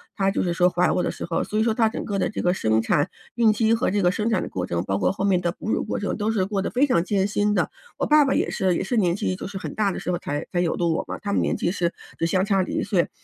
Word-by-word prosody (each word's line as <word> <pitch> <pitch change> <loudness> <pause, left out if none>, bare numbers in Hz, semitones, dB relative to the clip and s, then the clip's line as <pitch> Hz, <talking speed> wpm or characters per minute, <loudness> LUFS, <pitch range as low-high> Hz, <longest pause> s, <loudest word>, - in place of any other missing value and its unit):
她 195 -1 +1
就 195 - 0
是 175 -1 0
说 180 +1 +4
怀 180 0 +2
我 - - +1
的 - - -1
时 - - -5
候。 165 - 0
所 215 - -4
以 - - +3
说 225 -1 +2
她 225 -1 +3
整 - - -5
个 200 -2 -2
的 - - +1
这 - - -5
个 180 0 +3
生 110 -8 +1
产、 145 +8 +1 0.2
孕 230 -2 +4
期 220 +1 +2
和 230 - +1
这 200 0 0
个 175 - +4
生 215 +4 -1
产 225 - +1
的 - - -5
过 90 -1 -4
程， 85 0 -1
包 95 +1 -1
括 - - +2
后 195 - -2
面 185 -3 +2
的 175 - 0
哺 215 - -5
乳 - - 0
过 215 - -3
程， 205 - -2
都 210 0 -1
是 195 -4 +1
过 195 -1 -1
得 - - -2
非 260 +4 +3
常 170 -11 +2
艰 195 0 +1
辛 205 +1 +1
的。 - - 0 0.3
我 - - 0
爸 300 0 +6
爸 270 - +1
也 - - 0
是 185 -2 +1
也 - - -1
是 245 - -2
年 180 -5 +2
纪 185 -1 -1
就 - - -6
是 195 0 -6
很 195 - -6
大 210 -2 +1
的 - - -5
时 180 - -3
候 175 - -1
才 145 -3 -4
才 175 - +2
有 170 - 0
的 175 - 0
我 165 -1 0
嘛， - - -4
他 205 -1 -3
们 - - +2
年 - - 0
纪 170 - 0
是 175 -2 -1 0.2
只 165 - +1
相 185 +3 +1
差 195 -2 +2
1 185 - -2
岁， 190 -4 +1
195 Hz, 360 characters per minute, -24 LUFS, 175-215 Hz, 0.3 s, 爸